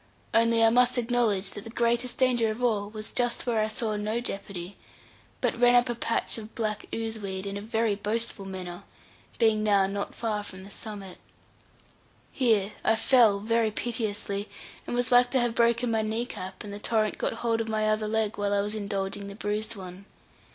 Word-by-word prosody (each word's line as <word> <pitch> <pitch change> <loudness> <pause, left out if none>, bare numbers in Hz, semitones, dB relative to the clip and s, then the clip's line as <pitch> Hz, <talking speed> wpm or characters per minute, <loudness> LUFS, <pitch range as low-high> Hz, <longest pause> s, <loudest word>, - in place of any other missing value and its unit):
Only 230 0 +4
I 225 - +6
must 250 +1 +4
acknowledge 230 -5 +1
that 205 - -7
the - - -8
greatest 235 +1 0
danger 245 -3 +3
of 220 +3 -4
all 210 -4 +1
was 215 0 -7
just 245 -1 0
where 235 -3 +1
I 215 - +2
saw 220 0 -2
no 215 +3 -1
jeopardy, 195 -5 -5 0.7
but - - 0
ran 245 0 +6
up 245 0 +4
a - - +1
patch 230 0 0
of 215 0 -11
black 215 -2 -2
ooze 225 -1 -3
weed 190 -1 -4
in 200 0 -4
a 200 - -4
very 225 0 0
boastful 210 0 -3
manner, 180 -2 -6 0.6
being 220 -2 +3
now 200 -2 +4
not 200 +1 -3
far 215 -3 -1
from 190 -2 -9
the 200 - -12
summit. 200 -3 -8 1.1
Here 220 -6 +2
I 220 - +4
fell 225 -3 +4
very 225 +1 +2
piteously, 210 -3 -2 0.4
and - - -2
was 245 +1 0
like 245 0 +6
to 260 - +2
have 240 -1 +1
broken 235 +1 +2
my 220 -1 +2
knee 220 +2 -1
cap, 190 -5 -7
and 205 -1 -7
the 205 - -6
torrent 215 -1 0
got - - 0
hold 230 0 0
of 225 - -4
my 215 -1 +1
other 215 0 +1
leg 220 -1 -1
while 205 0 +1
I 200 - +3
was 205 +1 -2
indulging 200 -1 -3
the 200 - -8
bruised 210 +2 -3
one. 185 0 -9
215 Hz, 200 wpm, -27 LUFS, 200-230 Hz, 1.1 s, I